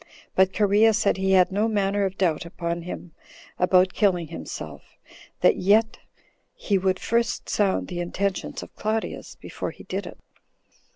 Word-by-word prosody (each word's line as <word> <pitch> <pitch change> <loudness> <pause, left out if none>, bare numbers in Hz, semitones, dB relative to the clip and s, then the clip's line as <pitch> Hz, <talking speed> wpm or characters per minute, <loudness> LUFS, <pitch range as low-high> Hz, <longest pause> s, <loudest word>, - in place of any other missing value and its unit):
But 190 0 +4
Cherea 210 +2 +4
said 205 -3 +1
he 190 0 +1
had 185 0 +5
no 205 +3 +1
manner 200 -2 +1
of 190 0 -4
doubt 170 -5 +1
upon 170 0 -4
him 175 0 -7 0.5
about 185 0 +4
killing 180 -6 +1
himself; 80 -1 -8 0.4
that - - +5
yet 220 +4 +3 0.6
he 205 - 0
would 185 0 +1
first 235 0 -1
sound 200 -3 +1
the 175 -2 -5
intentions 185 +2 -2
of - - -14
Claudius 220 +1 -3
before - - -6
he - - -12
did - - -4
it. - - -10
190 Hz, 155 wpm, -25 LUFS, 180-210 Hz, 0.6 s, had